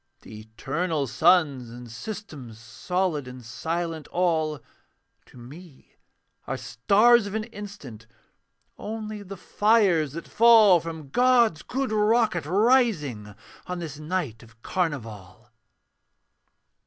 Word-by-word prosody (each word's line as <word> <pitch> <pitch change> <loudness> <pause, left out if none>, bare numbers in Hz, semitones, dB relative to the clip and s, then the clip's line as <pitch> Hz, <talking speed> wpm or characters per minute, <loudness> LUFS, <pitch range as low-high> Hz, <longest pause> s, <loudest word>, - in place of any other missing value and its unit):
The 110 - -11
eternal 140 +8 -3
suns 140 -2 +2
and 120 0 -11
systems, 150 - -8
Solid 150 +6 -3
and 125 -1 -11
silent 165 +6 -4
all, 160 -4 0 0.7
To - - -18
me 140 +5 -14 0.5
are - - -3
stars 210 - +3
of 205 - -6
an 220 - -1
instant, 200 - -10 0.7
Only 215 -1 -6
the 195 0 -9
fires 190 - +2
that 170 - -8
fall 220 -5 +6
From 160 -3 -8
God's 240 - +3
good 270 -2 -3
rocket, 215 -6 +1
rising 180 - +1 0.3
On 180 - -4
this 155 -4 -7
night 155 -8 -3
of 115 0 -20
carnival. 115 - -5
165 Hz, 110 wpm, -25 LUFS, 125-205 Hz, 0.7 s, fall